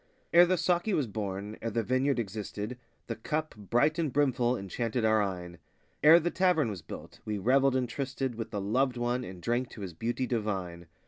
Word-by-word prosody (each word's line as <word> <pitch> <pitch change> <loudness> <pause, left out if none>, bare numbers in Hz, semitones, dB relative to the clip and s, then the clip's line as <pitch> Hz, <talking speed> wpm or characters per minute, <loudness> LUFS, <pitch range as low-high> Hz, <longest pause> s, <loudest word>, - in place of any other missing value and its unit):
Ere 175 +1 +8
the 185 +1 +2
saki 180 +4 +1
was 145 - +1
born, 105 -1 -4
ere 115 - -2
the 115 +1 -1
vineyard 130 +3 +1
existed, 105 +1 -4 0.3
The 115 - -4
cup, 155 +7 -2
bright 120 - +1
and 155 -5 0
brimful, 130 -3 +2
enchanted 115 +4 -2
our 110 -1 +4
eyne; 90 -4 -4 0.4
Ere 160 +3 +9
the 175 +1 -1
tavern 175 - +2
was 95 -4 -6
built, - - -10
we 105 -1 -3
revelled 130 +6 +3
and 130 -1 +1
trysted 135 0 -3
With 115 -1 -5
the 105 - -3
loved 125 +5 +1
One 120 +1 0
and 90 -4 -8
drank 120 +1 0
to 105 - -10
his 95 -3 -5
beauty 120 +8 -2
divine. 95 -8 -3
120 Hz, 195 wpm, -30 LUFS, 105-135 Hz, 0.4 s, Ere